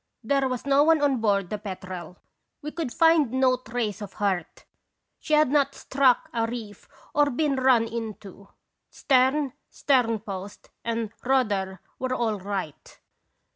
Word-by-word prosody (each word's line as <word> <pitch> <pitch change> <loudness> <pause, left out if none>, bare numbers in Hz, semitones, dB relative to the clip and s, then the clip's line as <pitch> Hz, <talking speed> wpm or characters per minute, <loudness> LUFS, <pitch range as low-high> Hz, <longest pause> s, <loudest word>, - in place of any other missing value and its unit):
There 275 +3 +1
was 255 0 -4
no 280 +1 +4
one 320 0 +4
on 285 -2 +2
board 200 -4 +1
the 210 - -3
Petrel. 185 -3 -7 0.5
We 300 - -4
could 320 -6 -4
find 325 -4 +4
no 260 -1 +3
trace 225 -3 -4
of 205 -2 -7
hurt; 190 -5 -2 0.5
she 310 - +1
had 300 -3 +4
not 280 -1 +2
struck 265 -2 +2
a 230 -1 0
reef 225 -4 -8 0.2
or 290 0 +3
been 285 +2 0
run 255 -3 +4
into; 215 -4 -7 0.4
stern, 265 +1 +2 0.2
sternpost, 215 -7 -1
and 230 -2 -2
rudder 205 -8 0 0.2
were 255 0 -1
all 220 -4 -1
right. 190 -6 -6
240 Hz, 140 wpm, -25 LUFS, 205-275 Hz, 0.5 s, no